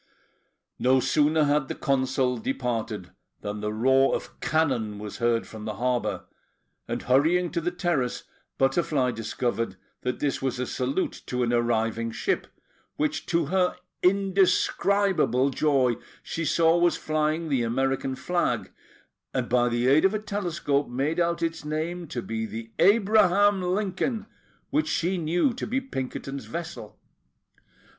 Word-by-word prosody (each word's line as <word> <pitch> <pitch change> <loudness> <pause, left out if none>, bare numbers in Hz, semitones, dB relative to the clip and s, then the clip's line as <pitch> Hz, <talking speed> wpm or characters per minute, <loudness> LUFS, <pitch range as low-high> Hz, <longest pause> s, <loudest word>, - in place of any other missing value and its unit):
No 130 +1 +4
sooner 155 +4 +3
had 145 -1 +2
the - - -4
Consul 130 -2 +1
departed 115 -6 -3 0.3
than 105 0 -4
the 105 0 -2
roar 130 +5 +3
of - - -7
cannon 130 -10 0
was 105 0 -7
heard 120 -1 +1
from 110 -1 -9
the 110 - -4
harbour; 125 0 -1 0.6
and, - - -3
hurrying 160 +7 +3
to 170 - -1
the 175 - 0
terrace, 175 -9 -1 0.3
Butterfly 135 -1 +2
discovered 115 -1 -2 0.3
that 125 0 -2
this 140 -2 -1
was 135 -2 -1
a 125 - -1
salute 130 +8 -2
to 125 0 -1
an 120 0 0
arriving 115 -1 +1
ship, 380 - -1 0.5
which, 305 0 -1
to 170 -2 +1
her 185 -1 +2 0.3
indescribable 190 -5 +2
joy, 130 -4 +2 0.3
she 165 - -3
saw 165 +2 +4
was 175 0 +3
flying 155 +1 -1
the 135 -4 +2
American 135 +3 0
flag, 175 +5 -1 0.6
and - - 0
by 120 0 +3
the 120 +1 0
aid 140 +4 +5
of 195 +2 +3
a - - 0
telescope 175 -9 -1
made 140 +7 -1
out 170 0 +1
its 165 -1 -2
name 160 +3 -3
to 120 -4 -4
be 110 0 -3
the 115 +1 -7
Abraham 205 0 +4
Lincoln, 200 +4 -1 0.5
which 305 +1 +1
she 180 +2 0
knew 175 - +1
to 245 - -5
be 255 +4 0
Pinkerton's 135 - -5
vessel. 170 0 -7
145 Hz, 145 wpm, -26 LUFS, 125-175 Hz, 0.6 s, aid